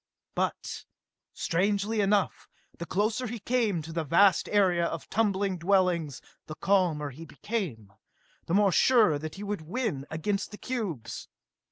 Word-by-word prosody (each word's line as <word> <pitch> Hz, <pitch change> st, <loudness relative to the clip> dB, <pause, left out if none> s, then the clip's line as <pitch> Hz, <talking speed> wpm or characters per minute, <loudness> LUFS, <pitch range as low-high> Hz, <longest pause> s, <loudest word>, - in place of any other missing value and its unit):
But -, -, -3 dB, 0.5 s
strangely 205 Hz, +4 st, 0 dB
enough, 200 Hz, 0 st, +1 dB, 0.3 s
the 170 Hz, -, -5 dB
closer 215 Hz, +8 st, 0 dB
he 235 Hz, +2 st, -4 dB
came 220 Hz, -6 st, 0 dB
to 160 Hz, +2 st, -8 dB
the 165 Hz, 0 st, -1 dB
vast 180 Hz, +5 st, +4 dB
area 185 Hz, -4 st, +3 dB
of 165 Hz, -3 st, -3 dB
tumbling 200 Hz, -4 st, +1 dB
dwellings 175 Hz, -5 st, +1 dB, 0.2 s
the 155 Hz, -, -6 dB
calmer 170 Hz, -8 st, +1 dB
he 150 Hz, +6 st, -10 dB
became, 160 Hz, -, -5 dB, 0.5 s
the 170 Hz, -, +1 dB
more 200 Hz, -1 st, +4 dB
sure 215 Hz, -, +4 dB
that 155 Hz, +1 st, -6 dB
he 200 Hz, -, -7 dB
would 205 Hz, -3 st, -3 dB
win 165 Hz, -, -3 dB
against 195 Hz, +5 st, -2 dB
the 210 Hz, -, -10 dB
cubes. 175 Hz, -, -4 dB
190 Hz, 145 wpm, -28 LUFS, 160-210 Hz, 0.5 s, vast